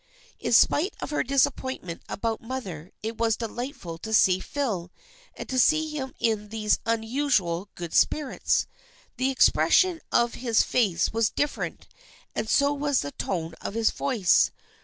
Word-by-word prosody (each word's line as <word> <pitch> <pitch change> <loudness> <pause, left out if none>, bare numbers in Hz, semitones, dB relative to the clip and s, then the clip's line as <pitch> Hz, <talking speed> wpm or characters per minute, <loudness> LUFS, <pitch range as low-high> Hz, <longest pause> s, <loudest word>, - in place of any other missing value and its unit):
In - - -3
spite 345 +7 +4
of - - -5
her 295 - +1
disappointment 260 -8 -1
about 225 +1 -2
her 230 - -15
mother 190 -10 -6
it 220 +1 -5
was 225 -2 +2
delightful 230 - -6
to 220 +4 -1
see 185 -3 +5
Phil, 205 -10 -3 0.5
and - - -7
to 260 - -1
see 310 +4 +3
him 265 -3 -5
in 215 -2 -1
these 215 -1 0
unusual 225 -6 0
good 170 -2 -7
spirits. 295 -4 +2 0.5
The 260 +1 +1
expression 330 +6 +3
of 235 0 +2
his 235 -3 +2
face 200 -9 +1
was 225 -1 +2
different 290 0 -3 0.5
and - - -3
so 280 0 +3
was 285 -1 0
the 145 - -5
tone 165 -1 -3
of 200 - -5
his 225 -1 +2
voice. 235 -10 +2
230 Hz, 155 wpm, -26 LUFS, 200-270 Hz, 0.5 s, see